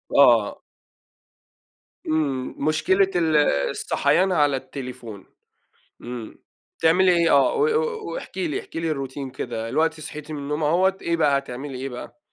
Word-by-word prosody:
آه. 120 Hz, -7 st, +5 dB, 1.5 s
إمم 140 Hz, -5 st, -1 dB
مشكلة 185 Hz, +6 st, +2 dB
ال 160 Hz, -3 st, +2 dB, 0.3 s
الصحيان 185 Hz, +1 st, +1 dB
على 145 Hz, -5 st, +3 dB
التليفون. 125 Hz, -6 st, -8 dB, 0.8 s
إمم 120 Hz, -2 st, -7 dB, 0.4 s
تعملي 180 Hz, +3 st, +5 dB
إيه 170 Hz, -1 st, +3 dB
آه 140 Hz, -, +4 dB
و 440 Hz, -, +2 dB
و 460 Hz, -1 st, -1 dB
واحكي 190 Hz, -, -4 dB
لي 145 Hz, -, -2 dB
احكي 165 Hz, -, -7 dB
لي 165 Hz, -, -1 dB
الروتين 135 Hz, -2 st, -4 dB
كده. 115 Hz, -2 st, -5 dB
دلوقتي 160 Hz, +2 st, 0 dB
صحيتِ 150 Hz, +1 st, -8 dB
من 150 Hz, -, -4 dB
النوم 150 Hz, +2 st, -3 dB
أهوّة 185 Hz, +5 st, +2 dB
إيه 170 Hz, 0 st, 0 dB
بقى، 145 Hz, -3 st, +3 dB
هتعملي 135 Hz, 0 st, -7 dB
إيه 135 Hz, +1 st, -4 dB
بقى؟ 125 Hz, -, -9 dB
150 Hz, 140 wpm, -23 LUFS, 135-170 Hz, 1.5 s, آه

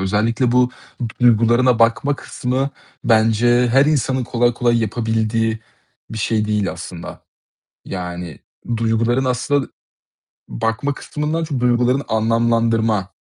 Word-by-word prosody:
Özellikle 115 Hz, +6 st, +1 dB
bu 125 Hz, 0 st, +4 dB
t -, -, -21 dB, 0.5 s
duygularına 120 Hz, +1 st, +4 dB
bakma 140 Hz, +5 st, +2 dB
kısmı 130 Hz, +2 st, -3 dB, 0.3 s
bence 115 Hz, +2 st, +3 dB
her 135 Hz, +4 st, +4 dB
insanın 130 Hz, -3 st, 0 dB
kolay 120 Hz, 0 st, +1 dB
kolay 120 Hz, 0 st, +1 dB
yapabildiği 110 Hz, 0 st, -1 dB, 0.5 s
bir 110 Hz, -, -5 dB
şey 110 Hz, 0 st, 0 dB
değil 105 Hz, -2 st, 0 dB
aslında, 85 Hz, -2 st, -9 dB, 0.6 s
yani 90 Hz, -4 st, -6 dB, 0.4 s
duyguların 115 Hz, +3 st, +1 dB
aslında 130 Hz, +2 st, 0 dB, 0.8 s
bakma 115 Hz, -, -2 dB
kısmından 155 Hz, +4 st, -3 dB
çok 145 Hz, -5 st, -3 dB
duygularını 125 Hz, +2 st, +2 dB
anlamlandırma, 115 Hz, -2 st, +1 dB
115 Hz, 110 wpm, -19 LUFS, 110-125 Hz, 0.8 s, bu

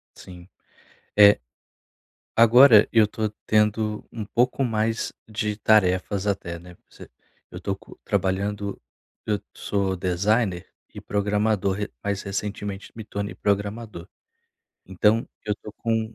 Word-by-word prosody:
Sim, 90 Hz, -1 st, -13 dB, 0.7 s
é. 105 Hz, 0 st, +8 dB, 1.0 s
Agora 115 Hz, -1 st, +7 dB
eu 110 Hz, -2 st, +5 dB
tô 110 Hz, +1 st, -2 dB, 0.2 s
tendo 105 Hz, 0 st, +1 dB
um 110 Hz, -3 st, -6 dB
pouco 125 Hz, +5 st, +1 dB
mais 115 Hz, -1 st, -1 dB, 0.2 s
de 105 Hz, -1 st, -2 dB
tarefas 100 Hz, -2 st, +2 dB
até, 95 Hz, -4 st, -2 dB
né, 90 Hz, +1 st, -13 dB
pra -, -, -26 dB
você -, -, -14 dB, 0.4 s
eu -, -, -8 dB
tô -, -, -2 dB
co -, -, -17 dB
trabalhando 100 Hz, +1 st, -2 dB, 0.5 s
eu 105 Hz, -1 st, 0 dB, 0.2 s
sou 100 Hz, -2 st, -1 dB
designer 95 Hz, +1 st, 0 dB, 0.3 s
e -, -, -8 dB
programador 105 Hz, -1 st, 0 dB
re 105 Hz, 0 st, -4 dB
mas 100 Hz, -1 st, -2 dB
recentemente 100 Hz, 0 st, -5 dB
me 110 Hz, -, -7 dB
tornei 100 Hz, -1 st, -5 dB
programador. 100 Hz, -2 st, -2 dB, 0.8 s
Então 105 Hz, +4 st, +2 dB, 0.2 s
eu 105 Hz, -1 st, -1 dB
tô 105 Hz, -, -10 dB
com 110 Hz, -1 st, -2 dB
105 Hz, 125 wpm, -24 LUFS, 100-110 Hz, 1.0 s, é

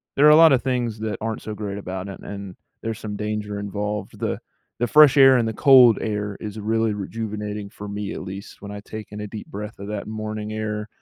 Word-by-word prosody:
there 145 Hz, -, +5 dB
are -, -, +9 dB
a 150 Hz, -, +8 dB
lot 165 Hz, 0 st, +8 dB
of 130 Hz, -2 st, +3 dB
things 125 Hz, -4 st, -1 dB
that 110 Hz, -2 st, -3 dB
aren't 110 Hz, 0 st, -3 dB
so 110 Hz, -, -5 dB
great 100 Hz, -1 st, -5 dB
about 95 Hz, -1 st, -5 dB
it 95 Hz, -, -8 dB
and 100 Hz, -2 st, -7 dB, 0.3 s
there's 115 Hz, -1 st, -4 dB
some 105 Hz, -1 st, -5 dB
danger 105 Hz, -1 st, -3 dB
involved, 105 Hz, 0 st, -4 dB
the -, -, -1 dB, 0.4 s
the 120 Hz, -, +2 dB
fresh 150 Hz, -1 st, +7 dB
air 135 Hz, -1 st, +8 dB
and 115 Hz, -2 st, +1 dB
the 110 Hz, -, -2 dB
cold 125 Hz, -2 st, +7 dB
air 105 Hz, -2 st, -3 dB
is 110 Hz, 0 st, -6 dB
really 110 Hz, +1 st, +1 dB
rejuvenating 105 Hz, 0 st, -4 dB
for 105 Hz, +1 st, -9 dB
me 100 Hz, 0 st, -4 dB
at -, -, -6 dB
least 95 Hz, +2 st, -9 dB
when 100 Hz, -, -8 dB
I 105 Hz, -, -6 dB
take 110 Hz, +1 st, -8 dB
in 105 Hz, 0 st, -6 dB
a 105 Hz, -, -5 dB
deep 105 Hz, 0 st, -8 dB
breath 105 Hz, +1 st, -7 dB
of 100 Hz, -, -7 dB
that 105 Hz, -1 st, -4 dB
morning 110 Hz, 0 st, -5 dB
air, 105 Hz, -1 st, -3 dB
105 Hz, 235 wpm, -23 LUFS, 105-110 Hz, 0.4 s, are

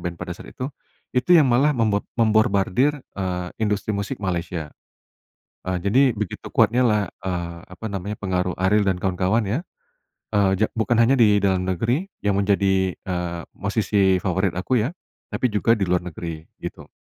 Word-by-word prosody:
band 85 Hz, -1 st, -4 dB
pada 85 Hz, -, -5 dB
saat -, -, -12 dB
itu, 130 Hz, -, -5 dB, 0.5 s
itu 125 Hz, +7 st, 0 dB
yang 150 Hz, -4 st, +6 dB
malah 130 Hz, +5 st, +4 dB
membor 110 Hz, -3 st, +1 dB, 0.2 s
memborbardir, 110 Hz, +5 st, +3 dB, 0.2 s
eee, 90 Hz, -2 st, -3 dB
industri 105 Hz, 0 st, 0 dB
musik 100 Hz, 0 st, -3 dB
Malaysia. 85 Hz, -5 st, -3 dB, 0.9 s
Eee, 95 Hz, -, 0 dB
jadi 110 Hz, +8 st, +4 dB
begitu 105 Hz, -3 st, -5 dB
kuatnya, 125 Hz, +2 st, +3 dB
lah, 105 Hz, -2 st, +3 dB, 0.2 s
eee, 85 Hz, -2 st, -3 dB, 0.2 s
apa 110 Hz, +5 st, -7 dB
namanya, 100 Hz, +2 st, -4 dB
pengaruh 90 Hz, -2 st, -1 dB
Ariel 100 Hz, +2 st, +2 dB
dan 95 Hz, -2 st, +2 dB
kawan-kawan, 95 Hz, +4 st, +1 dB
ya. 120 Hz, -, +1 dB, 0.7 s
Eee, 100 Hz, -2 st, +3 dB
ja 110 Hz, +3 st, +2 dB
bukan 110 Hz, +2 st, +2 dB
hanya 130 Hz, +4 st, +4 dB
di 105 Hz, -3 st, +5 dB
dalam 95 Hz, -1 st, +1 dB
negeri 120 Hz, -, 0 dB, 0.2 s
yang 100 Hz, -1 st, +1 dB
menjadi, 95 Hz, -2 st, +2 dB
eee, 90 Hz, -2 st, -4 dB, 0.2 s
musisi 100 Hz, -2 st, +1 dB
favorit 95 Hz, -1 st, 0 dB
aku, 120 Hz, +7 st, 0 dB
ya, 130 Hz, +10 st, -1 dB, 0.4 s
tapi 125 Hz, -, +1 dB
juga 105 Hz, +2 st, +3 dB
di 105 Hz, -, -1 dB
luar 90 Hz, 0 st, +1 dB
negeri, 80 Hz, -2 st, -6 dB, 0.2 s
gitu. -, -, -7 dB
100 Hz, 160 wpm, -23 LUFS, 90-110 Hz, 0.9 s, yang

